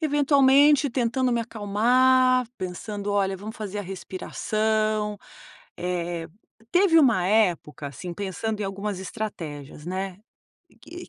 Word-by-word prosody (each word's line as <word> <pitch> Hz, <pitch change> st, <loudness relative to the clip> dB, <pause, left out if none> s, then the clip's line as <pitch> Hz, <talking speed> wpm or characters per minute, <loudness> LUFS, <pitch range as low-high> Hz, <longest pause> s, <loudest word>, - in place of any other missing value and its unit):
Eventualmente 285 Hz, -1 st, +4 dB
tentando 250 Hz, +1 st, 0 dB
me 235 Hz, -, +1 dB
acalmar, 250 Hz, +4 st, +3 dB
pensando: 200 Hz, +3 st, -4 dB
"Olha, 195 Hz, -1 st, +1 dB
vamos 215 Hz, +4 st, -8 dB
fazer 205 Hz, -1 st, -5 dB
a -, -, -3 dB
respiração". 215 Hz, +3 st, -2 dB, 0.6 s
Eh, 175 Hz, -1 st, -3 dB, 0.4 s
teve 355 Hz, -3 st, +5 dB
uma 240 Hz, -, +4 dB
época, 180 Hz, -8 st, +1 dB
assim, 170 Hz, +6 st, -7 dB
pensando 205 Hz, +3 st, -3 dB
em -, -, -1 dB
algumas 195 Hz, 0 st, -4 dB
estratégias, 165 Hz, -7 st, -7 dB
né. 190 Hz, +1 st, -4 dB, 0.6 s
Que 350 Hz, +1 st, -11 dB
210 Hz, 115 wpm, -25 LUFS, 185-250 Hz, 0.6 s, teve